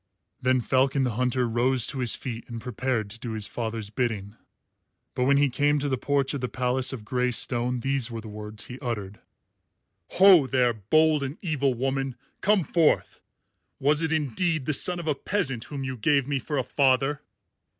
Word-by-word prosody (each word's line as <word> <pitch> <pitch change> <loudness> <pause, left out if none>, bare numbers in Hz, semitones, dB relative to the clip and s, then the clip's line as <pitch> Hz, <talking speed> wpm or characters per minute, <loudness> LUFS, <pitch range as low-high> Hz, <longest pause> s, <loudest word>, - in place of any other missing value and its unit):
Then 130 0 +2
Falcon 135 +3 +2
the 125 - 0
Hunter 125 +2 0
rose 120 +1 +2
to 135 - -2
his 125 -2 +1
feet 115 -3 -6
and 115 -1 -6
prepared 125 -1 -2
to 115 - -7
do 115 -1 -5
his 110 -2 -2
father's 110 -2 -4
bidding. 105 -3 -2 0.8
But 125 0 0
when 140 +1 +4
he 145 0 +4
came 145 +3 +1
to 145 0 -1
the 135 - +1
porch 140 +2 0
of 140 - -3
the 125 - -2
palace 130 +1 0
of 120 -6 -7
grey 125 +2 0
stone 125 0 -1
these 135 -2 0
were 115 -1 -5
the 110 - -9
words 105 0 -7
he 125 +1 -9
uttered: 105 -6 -5 0.9
"Ho, 185 -7 +7
there, 125 -2 +2
bold 155 +9 +2
and 140 +2 -4
evil 140 -6 0
woman! 135 +1 -2 0.3
Come 205 -2 +3
forth! 160 0 +1 0.6
Was 150 +3 +3
it 160 -1 -1
indeed 155 0 0
the 155 - 0
son 175 +5 +3
of 170 - -6
a 155 - +1
peasant 135 - -2
whom 140 -2 -6
you 130 -1 -4
gave 140 +2 +2
me 140 -2 0
for 145 +3 -4
a 130 - +1
father?" 135 +2 +1
130 Hz, 190 wpm, -26 LUFS, 120-145 Hz, 0.9 s, Ho